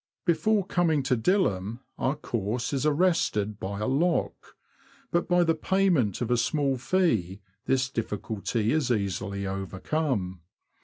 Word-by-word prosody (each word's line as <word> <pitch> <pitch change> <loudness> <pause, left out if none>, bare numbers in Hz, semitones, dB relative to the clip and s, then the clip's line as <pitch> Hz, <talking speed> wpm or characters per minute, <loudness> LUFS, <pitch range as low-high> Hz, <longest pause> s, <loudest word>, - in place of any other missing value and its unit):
Before 200 +3 +2
coming 165 -6 +1
to 130 -1 +2
Dilham 115 - 0 0.2
our 135 - +1
course 120 -2 -3
is 140 +2 +1
arrested 145 - +1
by 100 +1 -4
a 105 - -2
lock, 165 +7 0 0.6
but 170 0 +1
by 175 -1 +4
the 165 -1 +3
payment 160 - +1
of 120 0 -1
a 120 - +4
small 140 +3 +1
fee 115 - +1 0.3
this 135 0 +2
diffi 115 -5 -3
culty 105 +2 -2
is 155 -5 +1
easily 100 -2 -1
overcome. 95 - -2
125 Hz, 140 wpm, -27 LUFS, 100-160 Hz, 0.6 s, by